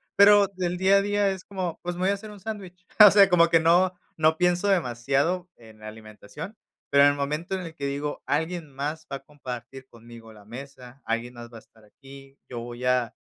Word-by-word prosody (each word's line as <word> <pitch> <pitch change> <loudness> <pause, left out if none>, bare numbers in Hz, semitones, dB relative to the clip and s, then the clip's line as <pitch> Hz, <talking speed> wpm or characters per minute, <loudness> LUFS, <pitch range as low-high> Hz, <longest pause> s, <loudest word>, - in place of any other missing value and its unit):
pero 200 0 +6
del 180 -1 -2
día 190 +2 +4
a - - +3
día 205 0 +1
es 190 -1 -5
como, 185 -5 -5
pues, 175 0 -4
voy 185 +2 0
a - - +2
hacer 210 +2 -8
un 205 - -12
sándwich. 190 -3 -8
O 210 -2 +10
sea, 200 -2 +6
como 170 -2 +4
que 165 - +4
no, 175 +3 +3 0.2
no 160 0 +3
pienso 180 +2 +1
demasiado 165 +2 0
en 110 -2 -17
la 110 - -10
alimentación, 110 - -10 0.3
pero 140 0 +5
en 145 - +6
el - - -4
momento 150 +6 -3
en 185 - -4
el 165 -2 -9
que 140 -3 -5
digo 145 +1 -4
alguien 160 +2 -2
más 150 +3 -5
va 140 - -3
a - - -17
compartir 130 -2 -9
conmigo 115 -1 -14
la 105 -1 -17
mesa, 130 +2 -11
alguien 115 +2 -3
más 120 0 -11
va 115 - -11
a - - -10
estar 110 0 -25
aquí, 135 +4 -16
yo 120 -2 -6
voy 120 +1 -7
a 125 -2 +1
150 Hz, 220 wpm, -25 LUFS, 125-180 Hz, 0.3 s, O